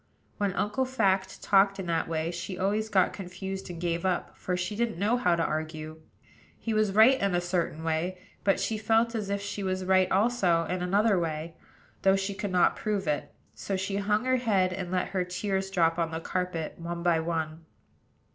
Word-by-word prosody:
When 200 Hz, -2 st, +1 dB
Uncle 210 Hz, +7 st, 0 dB
Fact 195 Hz, -7 st, 0 dB
talked 195 Hz, 0 st, +4 dB
in 190 Hz, -, -4 dB
that 170 Hz, -1 st, 0 dB
way, 165 Hz, 0 st, -1 dB
she 175 Hz, +2 st, -5 dB
always 210 Hz, +3 st, 0 dB
got 190 Hz, -4 st, +3 dB
confused 190 Hz, 0 st, -6 dB
and 175 Hz, -2 st, -7 dB
gave 170 Hz, -1 st, -1 dB
up; 185 Hz, -2 st, -1 dB
for 180 Hz, -1 st, -2 dB
she 180 Hz, +3 st, -3 dB
didn't 230 Hz, -4 st, -1 dB
know 205 Hz, +6 st, +2 dB
how 180 Hz, -9 st, +2 dB
to 170 Hz, -, 0 dB
argue. 155 Hz, 0 st, -4 dB, 0.6 s
He 225 Hz, -, -3 dB
was 215 Hz, -2 st, +2 dB
right 225 Hz, +6 st, +6 dB
in 200 Hz, -2 st, +1 dB
a -, -, +3 dB
certain 175 Hz, -3 st, -2 dB
way; 165 Hz, +3 st, -1 dB, 0.3 s
but 195 Hz, -, +3 dB
she 220 Hz, -1 st, -1 dB
felt 225 Hz, +2 st, +2 dB
as 210 Hz, -3 st, -3 dB
if 200 Hz, 0 st, -1 dB
she 205 Hz, 0 st, -4 dB
was 185 Hz, -1 st, -2 dB
right 185 Hz, 0 st, +3 dB
also 195 Hz, -5 st, +3 dB
in 180 Hz, +1 st, -2 dB
another 200 Hz, +2 st, +3 dB
way, 160 Hz, 0 st, -3 dB, 0.5 s
though 195 Hz, 0 st, +5 dB
she 195 Hz, +1 st, -2 dB
could 200 Hz, +1 st, -4 dB
not 180 Hz, -1 st, +4 dB
prove 205 Hz, -2 st, -2 dB
it: 150 Hz, -1 st, -1 dB, 0.2 s
so 195 Hz, -, -3 dB
she 195 Hz, +1 st, -2 dB
hung 210 Hz, +3 st, +1 dB
her 255 Hz, 0 st, +3 dB
head, 195 Hz, -7 st, +2 dB
and 185 Hz, -1 st, -4 dB
let 180 Hz, 0 st, -1 dB
her 185 Hz, -2 st, 0 dB
tears 190 Hz, +2 st, -2 dB
drop 170 Hz, -3 st, +2 dB
on 165 Hz, -1 st, +1 dB
the 160 Hz, 0 st, -4 dB
carpet 180 Hz, -2 st, -3 dB
one 170 Hz, 0 st, -5 dB
by 170 Hz, -2 st, +3 dB
one. 160 Hz, -1 st, -3 dB
185 Hz, 205 wpm, -28 LUFS, 170-205 Hz, 0.6 s, right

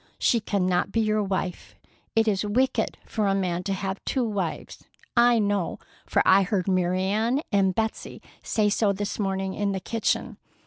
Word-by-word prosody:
She 235 Hz, -, +2 dB
cannot 185 Hz, -3 st, 0 dB
be 225 Hz, -, 0 dB
your 215 Hz, -1 st, +2 dB
wife. 190 Hz, -2 st, -3 dB, 0.4 s
It 225 Hz, 0 st, +3 dB
is 200 Hz, -2 st, +1 dB
wicked 230 Hz, +2 st, 0 dB
for 215 Hz, -2 st, -1 dB
a 195 Hz, -, +2 dB
man 180 Hz, -3 st, -1 dB
to 195 Hz, -, 0 dB
have 190 Hz, 0 st, -4 dB
two 260 Hz, -, 0 dB
wives. 195 Hz, -6 st, -4 dB, 0.3 s
I 240 Hz, 0 st, +5 dB
know, 205 Hz, -4 st, 0 dB, 0.3 s
for -, -, +2 dB
I 190 Hz, +1 st, +6 dB
heard 190 Hz, -1 st, -1 dB
Mary 185 Hz, 0 st, +1 dB
Ann 220 Hz, +8 st, +1 dB
and 195 Hz, -2 st, +2 dB
Betsey 220 Hz, 0 st, -3 dB, 0.2 s
say 215 Hz, -2 st, +1 dB
so 205 Hz, 0 st, +2 dB
this 205 Hz, +2 st, -4 dB
morning 190 Hz, -1 st, -1 dB
in 200 Hz, 0 st, -1 dB
the 190 Hz, -, -2 dB
kitchen. 225 Hz, +4 st, -1 dB
200 Hz, 175 wpm, -25 LUFS, 190-220 Hz, 0.4 s, I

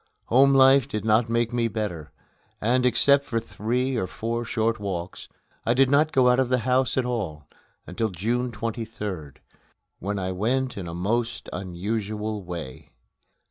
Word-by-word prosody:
Home 135 Hz, +3 st, +5 dB
life 135 Hz, -1 st, +6 dB
did 105 Hz, 0 st, -4 dB
not 110 Hz, +1 st, +3 dB
make 115 Hz, 0 st, 0 dB
me 120 Hz, -1 st, +1 dB
better, 100 Hz, -8 st, -4 dB, 0.5 s
and, 125 Hz, +3 st, +2 dB
except 140 Hz, +4 st, +4 dB
for 115 Hz, -4 st, -1 dB
three 125 Hz, +4 st, -2 dB
or 95 Hz, -, -1 dB
four 115 Hz, +5 st, -3 dB
short 115 Hz, -1 st, 0 dB
walks, 95 Hz, -3 st, -5 dB, 0.3 s
I 120 Hz, -, +1 dB
did 135 Hz, +1 st, +4 dB
not 150 Hz, +2 st, +4 dB
go 130 Hz, -2 st, +4 dB
out 125 Hz, +1 st, +4 dB
of 130 Hz, -2 st, +1 dB
the 130 Hz, -, +3 dB
house 130 Hz, -1 st, +2 dB
at 130 Hz, -, +2 dB
all 95 Hz, -, -3 dB, 0.4 s
until 110 Hz, +5 st, -2 dB
June 120 Hz, +7 st, -1 dB
23d, 105 Hz, -, -5 dB, 0.6 s
when 100 Hz, +2 st, -3 dB
I 95 Hz, -1 st, -2 dB
went 125 Hz, +7 st, -1 dB
in 95 Hz, -3 st, -6 dB
a 85 Hz, -, -6 dB
most 115 Hz, +6 st, -2 dB
unusual 105 Hz, +3 st, -3 dB
way. 85 Hz, -7 st, -7 dB
115 Hz, 160 wpm, -25 LUFS, 100-125 Hz, 0.6 s, life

